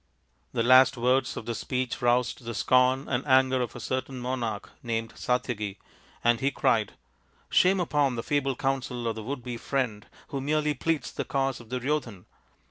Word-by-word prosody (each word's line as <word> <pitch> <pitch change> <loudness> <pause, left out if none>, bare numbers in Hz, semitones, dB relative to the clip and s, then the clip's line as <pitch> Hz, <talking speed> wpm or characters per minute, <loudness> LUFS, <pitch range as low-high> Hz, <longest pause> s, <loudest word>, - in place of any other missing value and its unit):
The 115 - 0
last 130 +2 +6
words 125 +3 +1
of - - -6
this 115 -1 -3
speech 125 0 -2
roused 120 +1 +1
the 115 -1 -5
scorn 130 +4 +3
and 125 -1 -1
anger 130 -1 +4
of 125 - -3
a - - -6
certain 130 0 -3
monarch 120 -4 -3
named 115 -1 -3
Satyaki, 105 -5 -2 0.5
and 120 -1 +3
he 135 - +2
cried, 110 -6 +1 0.3
" - - -36
Shame 190 +1 +4
upon 145 -6 +1
the 115 - -3
feeble 140 -2 0
counsel 125 -3 -2
of 115 - 0
the 110 - -7
would 125 +3 -5
be 120 -2 -5
friend, 115 -5 -2 0.2
who 140 - -3
merely 150 +1 +1
pleads 160 +3 -1
the - - -3
cause 135 -2 -1
of 115 -2 -14
Duryodhan. 125 -6 -2
125 Hz, 180 wpm, -27 LUFS, 115-135 Hz, 0.5 s, last